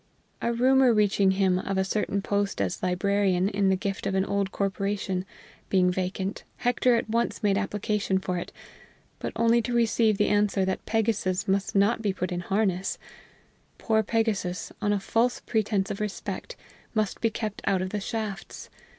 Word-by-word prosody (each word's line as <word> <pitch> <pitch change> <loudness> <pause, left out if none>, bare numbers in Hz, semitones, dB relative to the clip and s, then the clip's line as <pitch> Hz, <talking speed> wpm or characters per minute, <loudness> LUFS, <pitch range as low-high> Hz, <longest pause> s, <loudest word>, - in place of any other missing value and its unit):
A 235 - +1
rumor 255 +2 +4
reaching 200 -2 +3
him 190 -1 +2
of 195 +1 -2
a 190 - +3
certain 200 0 -1
post 200 -1 -1
as 95 -2 -1
librarian, 190 0 +1
in 200 -1 +1
the 190 - +4
gift 200 +4 -3
of 190 - -1
an 190 0 +2
old 200 -1 -1
corporation, 195 -1 -2 0.4
being 180 -2 +3
vacant, 190 +2 -3
Hector 245 0 +2
at 230 - -1
once 230 +1 -1
made 200 -2 +3
application 205 -1 0
for 185 -1 -2
it, - - -7 0.7
but - - -3
only 230 +1 +4
to 240 +2 -3
receive 225 -2 +3
the 210 - +3
answer 205 -2 +2
that 190 0 -3
Pegasus 215 -4 0
must 195 +1 0
not 205 +4 +3
be 205 -3 0
put 185 -1 -3
in 175 - -2
harness: 190 0 0 0.8
poor 220 -1 +2
Pegasus, 210 -4 -1
on 205 -1 +1
a 205 - +1
false 230 +5 +1
pretense 210 -3 0
of - - -4
respect, 210 - -4 0.4
must 215 -2 -1
be 230 - +3
kept 215 -1 -4
out 190 -2 +2
of 185 - -4
the 210 - -2
shafts! 215 -2 -5
200 Hz, 175 wpm, -27 LUFS, 190-220 Hz, 0.8 s, rumor